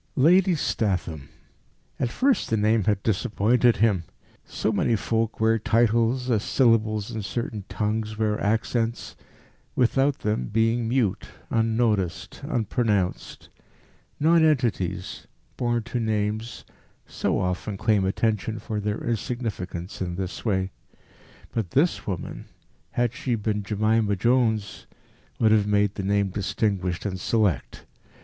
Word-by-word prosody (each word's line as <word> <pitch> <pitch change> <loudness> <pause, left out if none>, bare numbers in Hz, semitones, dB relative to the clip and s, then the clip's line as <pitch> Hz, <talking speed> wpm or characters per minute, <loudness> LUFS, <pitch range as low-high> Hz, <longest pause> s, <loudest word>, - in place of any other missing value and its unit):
Lady 180 +6 +5
Statham! 90 - -2 0.7
At 125 - 0
first 265 - +1
the 110 - +1
name 110 0 +2
had 105 -2 +1
disappointed 110 +3 +2
him. 100 -5 +2 0.4
So 110 - -2
many 110 +2 +1
folk 110 +1 -1
wear 110 0 +3
titles, 115 +3 +2
as 110 -3 +2
syllables 110 -5 +2
in 110 - -4
certain 105 -1 -4
tongues 105 0 -2
wear 105 -1 0
accents 115 +2 -1 0.6
without 135 +3 +2
them 105 -12 -1
being 115 +1 +1
mute, 120 -6 0 0.2
unnoticed, 110 -5 0
unpronounced. 110 - -1 0.7
Nonentities, 135 - +1 0.3
born 120 -2 0
to 120 +1 -3
names, 110 +1 -2 0.4
so - - -1
often 90 +3 -2
claim 105 -1 +2
attention 110 +2 0
for 105 0 -4
their 105 +1 -3
insignificance 105 -7 -4
in 90 -2 -2
this 95 0 -5
way. 95 -4 0 0.8
But 110 -6 -2
this 150 - +1
woman, 95 -4 -5 0.5
had 120 -1 +1
she 130 -3 -1
been 105 -1 -1
Jemima 105 +1 +1
Jones, 110 -2 +1 0.5
would 110 -1 +3
have 105 -2 +3
made 105 -1 +2
the - - -4
name 100 0 +1
distinguished 95 -2 -1
and 95 -2 -3
select. 95 - 0
110 Hz, 120 wpm, -25 LUFS, 100-120 Hz, 0.8 s, Lady